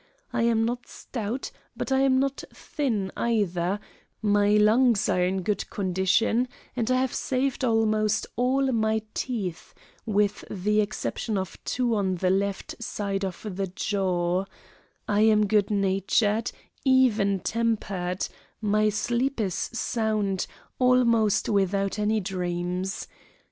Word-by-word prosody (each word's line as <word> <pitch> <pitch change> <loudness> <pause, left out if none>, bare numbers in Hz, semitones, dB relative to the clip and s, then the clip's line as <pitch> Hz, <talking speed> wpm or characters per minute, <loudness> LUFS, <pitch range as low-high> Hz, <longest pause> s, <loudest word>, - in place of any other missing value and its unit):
I 240 - +1
am 230 -1 +3
not 245 +1 -3
stout, 235 +2 -5 0.3
but - - -3
I 265 - +4
am 265 -1 +4
not 275 0 -1
thin, 220 -10 -2
either; 200 -4 0 0.4
my 205 -1 +3
lungs 215 0 +4
are 180 - +2
in 185 +1 0
good 210 +2 -1
condition 200 +5 +1 0.3
and 235 -2 -1
I 255 0 +3
have 260 -1 0
saved 265 +1 -1
almost 215 -2 +2
all 260 +3 +2
my 220 -2 +1
teeth, 200 -10 -4 0.3
with 205 -2 +1
the 210 +2 +1
exception 210 +1 -2
of 190 -1 -5
two 245 -2 0
on 195 -3 +1
the 180 +1 +1
left 200 +4 -2
side 200 -2 -2
of 190 +2 -5
the 195 -1 -3
jaw; 185 -1 0 0.6
I 205 0 +1
am 215 -1 +5
good 205 -1 +2
natured, 205 +3 +1 0.3
even 230 -7 +3
tempered; 200 -5 -1 0.3
my 215 0 +2
sleep 240 +5 -1
is 195 -5 0
sound, 215 -4 -1 0.3
almost 235 -5 +3
without 195 0 +1
any 215 +1 +2
dreams. 180 0 -3
210 Hz, 130 wpm, -26 LUFS, 195-235 Hz, 0.6 s, am